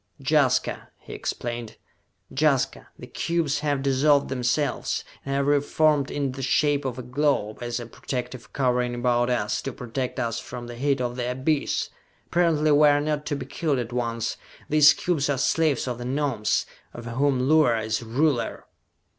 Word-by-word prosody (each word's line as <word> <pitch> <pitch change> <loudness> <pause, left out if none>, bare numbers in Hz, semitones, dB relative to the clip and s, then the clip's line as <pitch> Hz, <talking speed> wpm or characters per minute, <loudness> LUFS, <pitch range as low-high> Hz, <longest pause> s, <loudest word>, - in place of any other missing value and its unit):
"Jaska!" - - +1
he - - -11
explained. 120 -2 -5 0.6
"Jaska! 140 -2 +1
The - - -9
cubes 165 -4 -1
have 145 -2 -1
dissolved 140 +1 +3
themselves, 130 +3 -1 0.2
and 135 0 -2
have 140 0 +1
reformed 145 0 +2
in 140 -2 -2
the 135 +1 -7
shape 145 +2 +2
of 130 -2 -3
a 130 - -5
globe, 125 -4 0
as 120 0 -3
a 120 - -6
protective 125 +1 -6
covering 125 -2 0
about 120 0 +1
us, 110 -4 0
to 135 - -4
protect 125 +1 -4
us 115 -2 -1
from 120 -1 -8
the 120 - -8
heat 135 +2 0
of 120 0 -2
the 125 -1 -2
abyss! 135 +4 -1 0.3
Apparently 165 -3 +2
we 150 +1 +6
are 145 0 +4
not 150 0 -2
to 145 - -1
be 135 -2 -5
killed 150 +1 -1
at 120 -1 -4
once! 115 -2 -2 0.3
These 150 0 +6
cubes 155 -6 0
are 140 - +1
slaves 145 0 +1
of 125 -1 -3
the 120 - -5
Gnomes, 130 -5 0 0.3
of 120 - -8
whom 130 +2 +1
Luar 150 -6 +4
is 110 0 -2
ruler!" 120 +1 0
135 Hz, 170 wpm, -25 LUFS, 120-145 Hz, 0.6 s, we